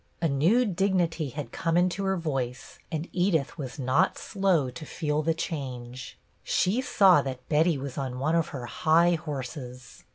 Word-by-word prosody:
A 170 Hz, -, +1 dB
new 165 Hz, -, +3 dB
dignity 180 Hz, -, 0 dB
had 145 Hz, +3 st, -6 dB
come 165 Hz, 0 st, 0 dB
into 180 Hz, +2 st, +1 dB
her 190 Hz, 0 st, +1 dB
voice, 135 Hz, -6 st, -4 dB
and 160 Hz, +2 st, -3 dB
Edith 175 Hz, -6 st, +1 dB
was 130 Hz, -4 st, -6 dB
not 130 Hz, -2 st, +2 dB
slow 185 Hz, -10 st, +1 dB
to 155 Hz, -, -9 dB
feel 150 Hz, -1 st, -2 dB
the 160 Hz, +1 st, 0 dB
change. 130 Hz, -6 st, -5 dB, 0.3 s
She 200 Hz, +8 st, +1 dB
saw 195 Hz, -8 st, +5 dB
that 130 Hz, -2 st, -6 dB
Betty 160 Hz, +1 st, +3 dB
was 135 Hz, 0 st, -5 dB
on 130 Hz, -2 st, -3 dB
one 145 Hz, +5 st, 0 dB
of 165 Hz, -2 st, +2 dB
her 125 Hz, -3 st, -6 dB
high 160 Hz, +7 st, +3 dB
horses. 130 Hz, -5 st, -6 dB
155 Hz, 165 wpm, -27 LUFS, 135-175 Hz, 0.3 s, saw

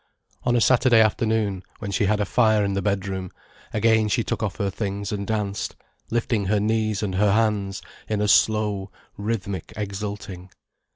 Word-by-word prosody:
On 120 Hz, -1 st, +3 dB
a 120 Hz, -, +3 dB
Saturday 120 Hz, -1 st, +5 dB
afternoon, 110 Hz, -3 st, +1 dB, 0.2 s
when 100 Hz, -2 st, -5 dB
she 105 Hz, +1 st, +1 dB
had 105 Hz, +2 st, +2 dB
a 105 Hz, -, +1 dB
fire 110 Hz, 0 st, +3 dB
in 100 Hz, -, -1 dB
the 100 Hz, -, -1 dB
bedroom, 95 Hz, -2 st, -2 dB, 0.4 s
again 110 Hz, 0 st, +3 dB
she 115 Hz, +3 st, +1 dB
took -, -, -3 dB
off 100 Hz, -4 st, -2 dB
her 100 Hz, -3 st, -1 dB
things 100 Hz, 0 st, -3 dB
and 100 Hz, -1 st, -3 dB
danced, 105 Hz, -2 st, -2 dB, 0.3 s
lifting 115 Hz, -3 st, 0 dB
her 105 Hz, +2 st, +2 dB
knees 110 Hz, -1 st, 0 dB
and 100 Hz, -3 st, -2 dB
her 100 Hz, +1 st, +3 dB
hands 105 Hz, -3 st, 0 dB, 0.3 s
in 105 Hz, -1 st, 0 dB
a 105 Hz, -, +1 dB
slow, 105 Hz, -2 st, +3 dB, 0.3 s
rhythmic 100 Hz, -2 st, -3 dB
exulting. 100 Hz, -2 st, -5 dB
105 Hz, 170 wpm, -24 LUFS, 100-110 Hz, 0.4 s, Saturday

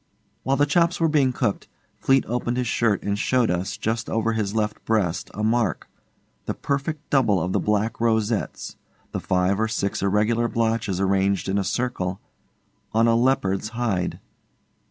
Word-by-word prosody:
While 135 Hz, +1 st, 0 dB
the 145 Hz, -, +4 dB
chops 170 Hz, +4 st, +2 dB
were 165 Hz, -, +3 dB
being 145 Hz, -4 st, +3 dB
cooked, 125 Hz, -5 st, -2 dB, 0.3 s
Fleete 135 Hz, 0 st, +3 dB
opened 120 Hz, +1 st, -2 dB
his 125 Hz, -, 0 dB
shirt 110 Hz, -3 st, +1 dB
and 100 Hz, 0 st, -1 dB
showed 125 Hz, -2 st, +2 dB
us, 90 Hz, +1 st, -2 dB
just 115 Hz, +1 st, -2 dB
over 115 Hz, 0 st, 0 dB
his 105 Hz, -2 st, -2 dB
left 105 Hz, -1 st, -1 dB
breast, 100 Hz, -7 st, 0 dB
a 105 Hz, -, -3 dB
mark, 115 Hz, -2 st, 0 dB, 0.6 s
the -, -, -2 dB
perfect 145 Hz, +2 st, -3 dB
double 110 Hz, -9 st, +3 dB
of 90 Hz, +2 st, -2 dB
the -, -, +2 dB
black 105 Hz, +2 st, 0 dB
rosettes 110 Hz, -2 st, -1 dB, 0.3 s
the -, -, -3 dB
five 90 Hz, +2 st, +1 dB
or 110 Hz, -, +2 dB
six 100 Hz, -2 st, -2 dB
irregular 105 Hz, +4 st, +2 dB
blotches 110 Hz, -5 st, 0 dB
arranged 95 Hz, -1 st, +1 dB
in 100 Hz, +1 st, +1 dB
a -, -, 0 dB
circle 95 Hz, -5 st, -2 dB, 0.7 s
on 115 Hz, +1 st, +4 dB
a 115 Hz, -, +4 dB
leopard's 110 Hz, -5 st, +1 dB
hide. 100 Hz, -7 st, -1 dB
110 Hz, 165 wpm, -24 LUFS, 100-120 Hz, 0.7 s, the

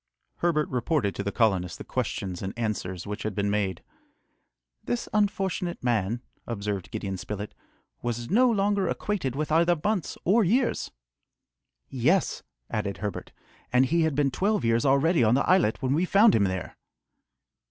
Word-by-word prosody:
Herbert 160 Hz, -3 st, +1 dB
reported 125 Hz, -, 0 dB
to 90 Hz, -, -4 dB
the 100 Hz, -, -2 dB
colonists 95 Hz, -6 st, +1 dB
the -, -, -8 dB
questions 90 Hz, -3 st, -3 dB
and 95 Hz, +4 st, -5 dB
answers 95 Hz, -6 st, -3 dB
which 105 Hz, +1 st, -5 dB
had 110 Hz, -3 st, -3 dB
been 100 Hz, 0 st, 0 dB
made. 100 Hz, -4 st, -1 dB, 1.0 s
"This 240 Hz, -, -2 dB
unfortunate 195 Hz, -5 st, 0 dB
man," 120 Hz, 0 st, 0 dB, 0.2 s
observed 100 Hz, -5 st, -3 dB
Gideon 95 Hz, 0 st, -4 dB
Spilett, 105 Hz, +2 st, -6 dB, 0.5 s
"was 120 Hz, +3 st, -3 dB
no 250 Hz, +5 st, +5 dB
longer 200 Hz, -3 st, +1 dB
acquainted 170 Hz, -10 st, -2 dB
with 155 Hz, +2 st, -2 dB
either 170 Hz, +1 st, +3 dB
months 210 Hz, -5 st, -1 dB
or 215 Hz, +6 st, +4 dB
years!" 235 Hz, +7 st, +1 dB, 1.0 s
"Yes!" 150 Hz, +9 st, +1 dB, 0.3 s
added 100 Hz, -2 st, -2 dB
Herbert, 105 Hz, -2 st, -5 dB, 0.4 s
"and 125 Hz, +1 st, +4 dB
he 170 Hz, +6 st, +2 dB
had 160 Hz, -3 st, +1 dB
been 140 Hz, -1 st, +2 dB
twelve 205 Hz, -, 0 dB
years 115 Hz, +2 st, +2 dB
already 140 Hz, +3 st, +3 dB
on 110 Hz, +2 st, +4 dB
the 140 Hz, -, +1 dB
islet 180 Hz, -, +3 dB
when 130 Hz, +1 st, +1 dB
we 165 Hz, +5 st, +2 dB
found 205 Hz, +4 st, +5 dB
him 100 Hz, -, +3 dB
there!" 95 Hz, -1 st, -4 dB
130 Hz, 155 wpm, -27 LUFS, -, 1.0 s, no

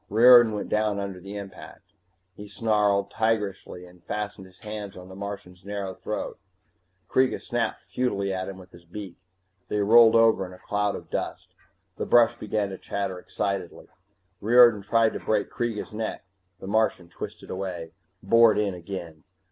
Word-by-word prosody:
Riordan 120 Hz, +1 st, +7 dB
went 105 Hz, -, -4 dB
down 105 Hz, -1 st, +1 dB
under 100 Hz, -2 st, -5 dB
the 100 Hz, +3 st, -8 dB
impact. 100 Hz, 0 st, -11 dB, 0.4 s
He 105 Hz, 0 st, -10 dB
snarled, 105 Hz, -2 st, +1 dB
tigerishly, 105 Hz, -5 st, -2 dB
and 90 Hz, -1 st, -18 dB
fastened 105 Hz, -2 st, -5 dB
his 95 Hz, 0 st, -21 dB
hands 105 Hz, -3 st, -7 dB
on 90 Hz, 0 st, -11 dB
the 95 Hz, -, -10 dB
Martian's 100 Hz, -2 st, -8 dB
narrow 100 Hz, -1 st, -4 dB
throat. 105 Hz, +3 st, -5 dB, 0.7 s
Kreega 130 Hz, 0 st, +2 dB
snapped 120 Hz, -1 st, -2 dB
futilely 100 Hz, -6 st, -1 dB
at 95 Hz, 0 st, -3 dB
him 95 Hz, -, -8 dB
with 90 Hz, -1 st, -14 dB
his 85 Hz, 0 st, -16 dB
beak. 90 Hz, +1 st, -9 dB, 0.5 s
They -, -, -2 dB
rolled 115 Hz, +2 st, +7 dB
over 115 Hz, -3 st, +5 dB
in 90 Hz, -1 st, -8 dB
a -, -, -12 dB
cloud 105 Hz, +1 st, -1 dB
of -, -, -10 dB
dust. -, -, -4 dB, 0.4 s
The -, -, -3 dB
brush 120 Hz, -1 st, +5 dB
began 105 Hz, -1 st, -2 dB
to 95 Hz, -, -8 dB
chatter 100 Hz, -2 st, -3 dB
excitedly. 100 Hz, -1 st, -4 dB, 0.5 s
Riordan 120 Hz, 0 st, +6 dB
tried 110 Hz, +2 st, +2 dB
to -, -, -4 dB
break 105 Hz, -2 st, -1 dB
Kreega's 115 Hz, -3 st, -3 dB
neck 110 Hz, -2 st, -4 dB, 0.3 s
the -, -, -9 dB
Martian 105 Hz, -3 st, 0 dB
twisted 85 Hz, -, -8 dB
away, 90 Hz, -4 st, -5 dB, 0.3 s
bored 115 Hz, +2 st, +5 dB
in 105 Hz, -2 st, 0 dB
again. 85 Hz, -3 st, -8 dB
100 Hz, 165 wpm, -26 LUFS, 95-110 Hz, 0.7 s, Riordan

